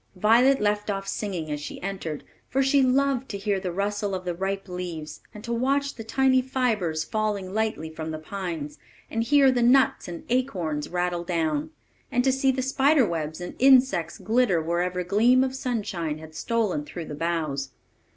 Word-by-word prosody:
Violet 235 Hz, +8 st, +4 dB
left 210 Hz, 0 st, 0 dB
off 195 Hz, -1 st, -2 dB
singing 180 Hz, -7 st, -3 dB
as 150 Hz, -, -2 dB
she -, -, -7 dB
entered 180 Hz, -6 st, -4 dB
it; -, -, -27 dB, 0.2 s
for 270 Hz, +1 st, +2 dB
she 275 Hz, +1 st, +4 dB
loved 265 Hz, 0 st, +2 dB
to 200 Hz, -, -4 dB
hear 200 Hz, -1 st, -1 dB
the 185 Hz, -2 st, -3 dB
rustle 200 Hz, +2 st, -1 dB
of 185 Hz, 0 st, -6 dB
the 175 Hz, -, -1 dB
ripe 195 Hz, +2 st, -3 dB
leaves, 175 Hz, -4 st, -6 dB
and 210 Hz, -, -11 dB
to 235 Hz, 0 st, -3 dB
watch 275 Hz, +4 st, 0 dB
the 225 Hz, -, -8 dB
tiny 260 Hz, +3 st, +3 dB
fibres 220 Hz, -12 st, 0 dB
falling 205 Hz, -3 st, -2 dB
lightly 220 Hz, -7 st, -1 dB
from 160 Hz, 0 st, -6 dB
the 155 Hz, -, -4 dB
pines, 155 Hz, -4 st, -5 dB, 0.3 s
and 225 Hz, -, 0 dB
hear 275 Hz, +1 st, +5 dB
the 245 Hz, -1 st, +1 dB
nuts 255 Hz, +3 st, +4 dB
and 175 Hz, -1 st, -7 dB
acorns 180 Hz, -, -1 dB
rattle 175 Hz, -1 st, -1 dB
down, 175 Hz, -, -1 dB, 0.4 s
and 245 Hz, -, +2 dB
to 265 Hz, -, +3 dB
see 270 Hz, +1 st, +1 dB
the 260 Hz, 0 st, +1 dB
spider 270 Hz, +1 st, +3 dB
webs 160 Hz, -2 st, -3 dB
and 175 Hz, 0 st, -6 dB
insects 255 Hz, -11 st, +4 dB
glitter 220 Hz, -2 st, +2 dB
wherever 175 Hz, +3 st, -1 dB
a -, -, -2 dB
gleam 230 Hz, +8 st, +4 dB
of 260 Hz, 0 st, -2 dB
sunshine 200 Hz, -, -3 dB
had 155 Hz, 0 st, -12 dB
stolen 215 Hz, -7 st, -1 dB
through 160 Hz, +3 st, -7 dB
the 150 Hz, -, -7 dB
boughs. 150 Hz, -4 st, -2 dB
200 Hz, 190 wpm, -25 LUFS, 170-250 Hz, 0.4 s, hear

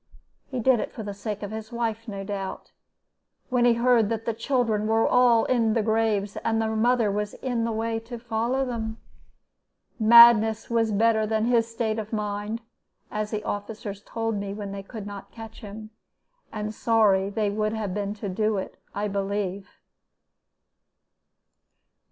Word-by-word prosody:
He 260 Hz, -, -3 dB
did 245 Hz, 0 st, +4 dB
it -, -, -3 dB
for 220 Hz, -, -7 dB
the 205 Hz, -1 st, -5 dB
sake 210 Hz, +1 st, -5 dB
of 205 Hz, -, -5 dB
his 220 Hz, +1 st, -7 dB
wife, 230 Hz, -1 st, -3 dB
no 200 Hz, -2 st, -5 dB
doubt. 195 Hz, -1 st, -5 dB, 0.8 s
When 250 Hz, -2 st, +2 dB
he 240 Hz, -, +6 dB
heard 235 Hz, -3 st, +3 dB
that 225 Hz, -1 st, -3 dB
the 230 Hz, -, 0 dB
children 225 Hz, -3 st, 0 dB
were 225 Hz, +1 st, +3 dB
all 245 Hz, -2 st, +4 dB
in 230 Hz, -3 st, +2 dB
their 225 Hz, -1 st, +1 dB
graves, 220 Hz, -2 st, 0 dB
and 225 Hz, -1 st, 0 dB
their 220 Hz, 0 st, 0 dB
mother 225 Hz, -2 st, +2 dB, 0.3 s
in 245 Hz, -3 st, 0 dB
the 230 Hz, -, -1 dB
way 225 Hz, +1 st, -1 dB
to 235 Hz, +2 st, -8 dB
follow 235 Hz, +3 st, -1 dB
them, 225 Hz, -3 st, -4 dB, 1.0 s
madness 225 Hz, -1 st, +7 dB
was 225 Hz, -1 st, +2 dB
better 220 Hz, +1 st, +3 dB
than 220 Hz, 0 st, +1 dB
his 230 Hz, -1 st, +2 dB
state 225 Hz, -1 st, -2 dB
of 215 Hz, 0 st, -6 dB
mind, 210 Hz, +1 st, -3 dB, 0.5 s
as 210 Hz, 0 st, -2 dB
the 215 Hz, -1 st, -3 dB
officers 205 Hz, -1 st, -5 dB
told 225 Hz, -2 st, -2 dB
me 200 Hz, 0 st, -4 dB
when 205 Hz, -2 st, -6 dB
they 200 Hz, 0 st, -5 dB
could 210 Hz, +1 st, -8 dB
not 200 Hz, -1 st, -8 dB
catch 225 Hz, -1 st, -10 dB
him 215 Hz, +1 st, -9 dB, 0.6 s
and 215 Hz, 0 st, -4 dB
sorry 205 Hz, -4 st, +3 dB
they 205 Hz, 0 st, -1 dB
would 215 Hz, +1 st, -1 dB
have 210 Hz, -4 st, -3 dB
been 205 Hz, 0 st, -3 dB
to 205 Hz, -1 st, -6 dB
do 215 Hz, +2 st, 0 dB
it, 190 Hz, -, -6 dB, 0.2 s
I 205 Hz, +1 st, -1 dB
believe. 200 Hz, -1 st, -3 dB
220 Hz, 165 wpm, -26 LUFS, 205-230 Hz, 1.0 s, madness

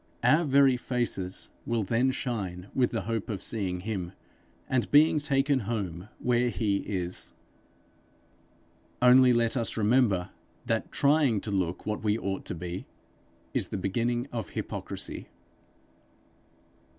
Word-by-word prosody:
Our 155 Hz, +8 st, +4 dB
very 135 Hz, -2 st, +5 dB
faces 115 Hz, -7 st, -2 dB
will 115 Hz, -2 st, 0 dB
then 115 Hz, +6 st, +2 dB
shine 100 Hz, -8 st, -3 dB
with 125 Hz, -2 st, +2 dB
the 115 Hz, -, -2 dB
hope 115 Hz, -2 st, -3 dB
of 100 Hz, -4 st, -3 dB
seeing 95 Hz, -5 st, -2 dB
him, 95 Hz, -3 st, -4 dB, 0.5 s
and 125 Hz, -2 st, 0 dB
being 150 Hz, +1 st, +5 dB
taken 140 Hz, -1 st, +2 dB
home 100 Hz, -5 st, -4 dB
where 125 Hz, 0 st, +2 dB
he 100 Hz, -1 st, 0 dB
is. 90 Hz, -3 st, -3 dB, 1.7 s
Only 125 Hz, +1 st, +7 dB
let 115 Hz, 0 st, +2 dB
us 115 Hz, -3 st, -2 dB
remember 105 Hz, -5 st, +2 dB, 0.3 s
that -, -, -1 dB
trying 140 Hz, -6 st, +3 dB
to 105 Hz, -, -4 dB
look 90 Hz, -3 st, -1 dB
what 105 Hz, 0 st, -3 dB
we 105 Hz, 0 st, +2 dB
ought 95 Hz, -3 st, -3 dB
to -, -, -4 dB
be, 90 Hz, +2 st, -6 dB, 0.7 s
is -, -, 0 dB
the -, -, -4 dB
beginning 120 Hz, +6 st, -1 dB
of 115 Hz, -5 st, -4 dB
hypocrisy. -, -, -4 dB
115 Hz, 130 wpm, -28 LUFS, 95-125 Hz, 1.7 s, Only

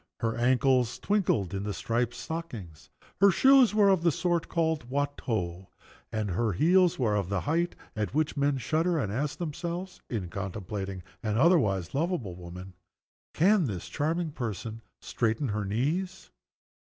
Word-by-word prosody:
Her 115 Hz, 0 st, 0 dB
ankles 125 Hz, 0 st, +2 dB
twinkled 175 Hz, -, 0 dB
in 100 Hz, +2 st, -2 dB
striped 120 Hz, +3 st, -1 dB
stockings. 115 Hz, -, -7 dB, 0.3 s
Her 200 Hz, +1 st, +7 dB
shoes 260 Hz, +3 st, +5 dB
were 205 Hz, -2 st, +5 dB
of 190 Hz, -3 st, +3 dB
the 170 Hz, 0 st, +3 dB
sort 175 Hz, +2 st, 0 dB
called 160 Hz, -6 st, 0 dB
"Watteau." 110 Hz, -10 st, -2 dB, 0.4 s
And 110 Hz, -3 st, -2 dB
her 110 Hz, +3 st, 0 dB
heels 175 Hz, -, +4 dB
were 110 Hz, -5 st, +1 dB
of 100 Hz, -3 st, -1 dB
the 100 Hz, -2 st, 0 dB
height 170 Hz, +3 st, 0 dB, 0.2 s
at 105 Hz, -1 st, -2 dB
which 155 Hz, 0 st, +1 dB
men 140 Hz, -1 st, +1 dB
shudder, 160 Hz, +7 st, +1 dB
and 105 Hz, -10 st, -1 dB
ask 140 Hz, +6 st, -2 dB
themselves 175 Hz, +3 st, -5 dB
(in 100 Hz, -7 st, -3 dB
contemplating 95 Hz, -1 st, -5 dB, 0.2 s
an 110 Hz, -2 st, -1 dB
otherwise 110 Hz, -, +3 dB
lovable 145 Hz, -, -1 dB
woman), 90 Hz, +1 st, -9 dB, 0.6 s
"Can 190 Hz, +1 st, +4 dB
this 90 Hz, -5 st, -5 dB
charming 160 Hz, -, -1 dB
person 115 Hz, -, -5 dB, 0.2 s
straighten 115 Hz, +3 st, -1 dB
her 105 Hz, 0 st, -2 dB
knees?" 160 Hz, -, -2 dB
125 Hz, 145 wpm, -28 LUFS, 105-170 Hz, 0.6 s, Her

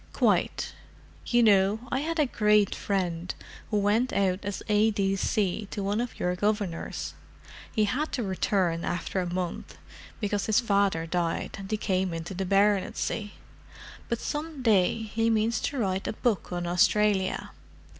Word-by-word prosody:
"Quite. -, -, +1 dB, 0.5 s
You 240 Hz, -1 st, +4 dB
know, 205 Hz, 0 st, +4 dB
I 265 Hz, -, +1 dB
had 330 Hz, +3 st, -2 dB
a 300 Hz, -, +4 dB
great 210 Hz, -4 st, +3 dB
friend 180 Hz, -3 st, -2 dB, 0.4 s
who 210 Hz, -, +1 dB
went 210 Hz, +5 st, +2 dB
out 190 Hz, -2 st, +1 dB
as 200 Hz, -1 st, -4 dB
A.D.C. 205 Hz, -1 st, +1 dB
to 200 Hz, -, -4 dB
one 205 Hz, +3 st, 0 dB
of 245 Hz, -, -5 dB
your 180 Hz, 0 st, 0 dB
Governors. 205 Hz, -3 st, -2 dB, 0.6 s
He 215 Hz, -, +2 dB
had 270 Hz, +9 st, -1 dB
to 245 Hz, -, -1 dB
return 185 Hz, -3 st, 0 dB
after 180 Hz, +2 st, -2 dB
a 175 Hz, -1 st, -3 dB
month, 180 Hz, -1 st, -4 dB, 0.4 s
because 205 Hz, -1 st, -1 dB
his 220 Hz, +1 st, +4 dB
father 200 Hz, -7 st, +1 dB
died 170 Hz, 0 st, -2 dB
and 195 Hz, 0 st, -8 dB
he 215 Hz, -, 0 dB
came 185 Hz, -3 st, 0 dB
into 165 Hz, +3 st, -5 dB
the 190 Hz, 0 st, -3 dB
baronetcy, 205 Hz, +1 st, +1 dB, 0.8 s
but 235 Hz, -, 0 dB
some 300 Hz, -2 st, -4 dB
day 220 Hz, -1 st, +3 dB
he 225 Hz, +1 st, 0 dB
means 220 Hz, 0 st, +2 dB
to 285 Hz, -, -3 dB
write 190 Hz, -5 st, -1 dB
a -, -, -1 dB
book 215 Hz, -4 st, -1 dB
on 175 Hz, 0 st, -2 dB
Australia. 190 Hz, +2 st, +2 dB
205 Hz, 155 wpm, -27 LUFS, 185-220 Hz, 0.8 s, You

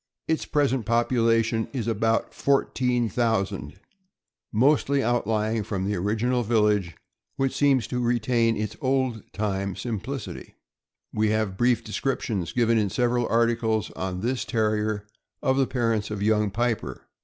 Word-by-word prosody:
Its 160 Hz, -, 0 dB
present 135 Hz, -4 st, +1 dB
population 115 Hz, -1 st, +2 dB
is 125 Hz, -5 st, -2 dB
about 115 Hz, 0 st, 0 dB
14,000, 120 Hz, -, 0 dB, 0.7 s
mostly 140 Hz, +3 st, +3 dB
outlying 110 Hz, -2 st, 0 dB
from 100 Hz, -2 st, -3 dB
the 105 Hz, +1 st, -1 dB
original 110 Hz, +7 st, 0 dB
village, 105 Hz, -6 st, +1 dB, 0.4 s
which 135 Hz, -1 st, 0 dB
seems 135 Hz, -3 st, +3 dB
to 125 Hz, -, -3 dB
retain 120 Hz, -1 st, +1 dB
its 105 Hz, 0 st, -3 dB
old 130 Hz, -4 st, 0 dB
time 100 Hz, -2 st, -2 dB
simplicity. 110 Hz, -, -5 dB, 0.6 s
We 110 Hz, 0 st, +1 dB
have 110 Hz, -3 st, 0 dB
brief 120 Hz, +2 st, +2 dB
descriptions, 110 Hz, -6 st, -2 dB
given 115 Hz, -2 st, +2 dB
in 105 Hz, -2 st, +1 dB
several 120 Hz, +2 st, +1 dB
articles 115 Hz, -2 st, +1 dB
on 95 Hz, -1 st, -4 dB
this 125 Hz, +3 st, -1 dB
Terrier, 105 Hz, -2 st, 0 dB, 0.4 s
of 130 Hz, 0 st, +2 dB
the 135 Hz, -2 st, +3 dB
parents 115 Hz, -4 st, 0 dB
of 105 Hz, -1 st, -3 dB
Young 105 Hz, -1 st, +2 dB
Piper. 110 Hz, -, -2 dB
115 Hz, 130 wpm, -25 LUFS, 105-125 Hz, 0.7 s, mostly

